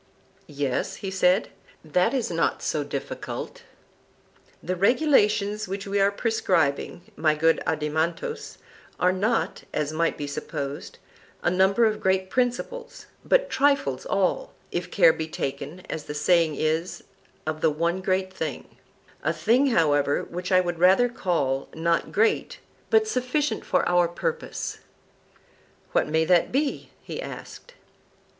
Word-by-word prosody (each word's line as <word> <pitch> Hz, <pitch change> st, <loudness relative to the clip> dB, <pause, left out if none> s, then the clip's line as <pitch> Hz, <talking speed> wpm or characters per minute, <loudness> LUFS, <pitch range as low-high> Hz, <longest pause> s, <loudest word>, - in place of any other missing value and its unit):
Yes, 140 Hz, -3 st, -2 dB
he 195 Hz, -, -5 dB
said; 190 Hz, +2 st, +2 dB, 0.4 s
that 180 Hz, +7 st, +2 dB
is 260 Hz, -8 st, -1 dB
not 165 Hz, -1 st, 0 dB
so 150 Hz, -, 0 dB
difficult. 140 Hz, -1 st, -6 dB, 1.0 s
The 185 Hz, -, -2 dB
regulations 210 Hz, -, +2 dB
which 195 Hz, +1 st, -4 dB
we 200 Hz, 0 st, 0 dB
are 200 Hz, +1 st, +4 dB
prescribing, 175 Hz, -7 st, 0 dB
my 155 Hz, -1 st, +2 dB
good 160 Hz, +1 st, +3 dB
Adeimantus, 160 Hz, -, -2 dB, 0.4 s
are 180 Hz, -, +4 dB
not, 215 Hz, +5 st, 0 dB
as 150 Hz, 0 st, -2 dB
might 165 Hz, +1 st, 0 dB
be 145 Hz, -, -4 dB
supposed, 140 Hz, 0 st, -5 dB, 0.5 s
a 175 Hz, -, +2 dB
number 190 Hz, +5 st, +4 dB
of 215 Hz, -1 st, +1 dB
great 190 Hz, 0 st, +1 dB
principles, 255 Hz, -, -2 dB, 0.2 s
but -, -, +3 dB
trifles 275 Hz, -, +1 dB
all, 195 Hz, -2 st, 0 dB, 0.2 s
if 175 Hz, +1 st, -3 dB
care 170 Hz, -4 st, +5 dB
be 160 Hz, -, -4 dB
taken, 140 Hz, +3 st, -5 dB
as 155 Hz, -, -5 dB
the 150 Hz, -, -6 dB
saying 160 Hz, 0 st, +3 dB
is, 160 Hz, +4 st, -1 dB, 0.4 s
of 155 Hz, 0 st, -3 dB
the 160 Hz, -, +4 dB
one 170 Hz, +4 st, -1 dB
great 185 Hz, 0 st, 0 dB
thing,—a 160 Hz, 0 st, -6 dB
thing, 230 Hz, -, +3 dB
however, 145 Hz, -, +2 dB
which 180 Hz, +2 st, -6 dB
I 185 Hz, 0 st, +6 dB
would 175 Hz, -2 st, -3 dB
rather 190 Hz, +8 st, +5 dB
call, 150 Hz, -, -1 dB
not 170 Hz, +1 st, 0 dB
great, 225 Hz, -, +1 dB, 0.3 s
but 440 Hz, -1 st, +4 dB
sufficient 285 Hz, -, -1 dB
for -, -, +1 dB
our 175 Hz, -1 st, +4 dB
purpose. 465 Hz, -, -4 dB, 1.1 s
What -, -, +2 dB
may 160 Hz, +1 st, +2 dB
that 175 Hz, 0 st, +3 dB
be? 280 Hz, +2 st, -1 dB
he -, -, -6 dB
asked. -, -, -9 dB
180 Hz, 135 wpm, -25 LUFS, 155-215 Hz, 1.1 s, I